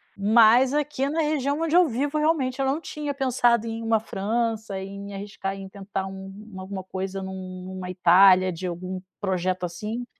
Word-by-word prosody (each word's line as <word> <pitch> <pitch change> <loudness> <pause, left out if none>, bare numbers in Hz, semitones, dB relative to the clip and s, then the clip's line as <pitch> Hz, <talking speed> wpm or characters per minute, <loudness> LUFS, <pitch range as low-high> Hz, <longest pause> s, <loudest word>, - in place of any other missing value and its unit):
mas 225 +5 +5
aqui 295 -2 0
na 320 +3 0
região 295 -1 0
onde 330 0 +1
eu 360 -2 +6
vivo 280 +5 -1
realmente, 285 -4 +1
eu 270 - +1
não 270 +3 +1
tinha 300 -3 -5
pensado 245 -4 +2
em 225 0 -4
uma 225 -1 +2
França 220 -1 -2
em 195 +1 -7
me 200 0 -8
arriscar 195 -1 -5
em 195 0 -8
tentar 195 0 -5 0.6
alguma 190 0 -6
coisa 190 +1 -5
num 185 -1 -7
numa 185 -1 -6
Itália 185 +1 +6
de 180 +2 -5
algum 180 +1 -5 0.2
projeto 185 -2 -1
assim. 210 +8 -5
205 Hz, 170 wpm, -25 LUFS, 190-260 Hz, 0.6 s, eu